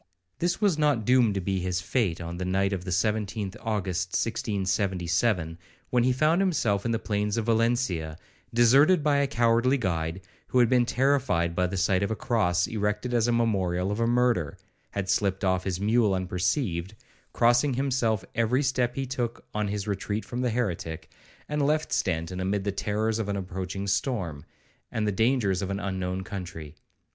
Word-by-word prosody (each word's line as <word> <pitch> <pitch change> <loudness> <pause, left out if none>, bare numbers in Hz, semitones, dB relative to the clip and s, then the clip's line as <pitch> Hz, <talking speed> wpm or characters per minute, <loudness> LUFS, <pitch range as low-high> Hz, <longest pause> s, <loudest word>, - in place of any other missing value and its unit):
This 175 0 0
was 195 -7 +2
not 145 -8 +2
doomed 125 -5 +4
to 95 - -1
be 95 +1 -1
his 90 0 -1
fate 90 -2 -1
on 85 0 -6
the 90 - -3
night 95 +2 +1
of 90 -2 -4
the - - -4
17th 105 +1 -1
August 95 -4 -2
1677, 95 -4 0 0.3
when 125 -1 +3
he 130 - +3
found 155 +7 +2
himself 115 - +1
in - - 0
the 115 - +1
plains 105 -1 -1
of 115 - -1
Valencia, 115 -9 0 0.3
deserted 140 +9 +5
by 145 -1 +3
a 140 0 +2
cowardly 120 +1 +2
guide, 85 -5 -2 0.3
who - - -1
had 120 -2 +5
been 125 -2 +3
terrified 125 -10 +1
by 90 +1 +1
the 95 +2 -4
sight 95 +1 +2
of 100 - 0
a 110 - -1
cross 90 -8 +1
erected 105 +3 -2
as 120 -1 +2
a - - +2
memorial 95 -5 +1
of 105 - -2
a 115 - +2
murder, 120 -10 +1 0.3
had 100 -2 -4
slipped 95 0 0
off 95 -1 +1
his 95 -2 -2
mule 105 -1 +2
unperceived, 90 - -1 0.4
crossing 120 +3 +3
himself 125 -6 0
every 115 +5 +1
step 125 -2 0
he 135 - -2
took 120 -2 -4
on 105 -1 -1
his 100 0 -3
retreat 105 +1 -2
from 125 +1 -4
the 125 - +1
heretic, 90 -9 -3 0.4
and 150 0 -1
left 155 +2 +1
Stanton 85 0 -1
amid 95 +2 -1
the 100 - -1
terrors 105 +3 -1
of 105 -2 -2
an 100 - -1
approaching 95 +1 -4
storm, 95 - -1 0.5
and 110 - -1
the 105 - +1
dangers 110 -3 +1
of 95 - -3
an 100 0 -2
unknown 95 -1 -3
country. 85 -6 -7
105 Hz, 180 wpm, -27 LUFS, 95-120 Hz, 0.5 s, deserted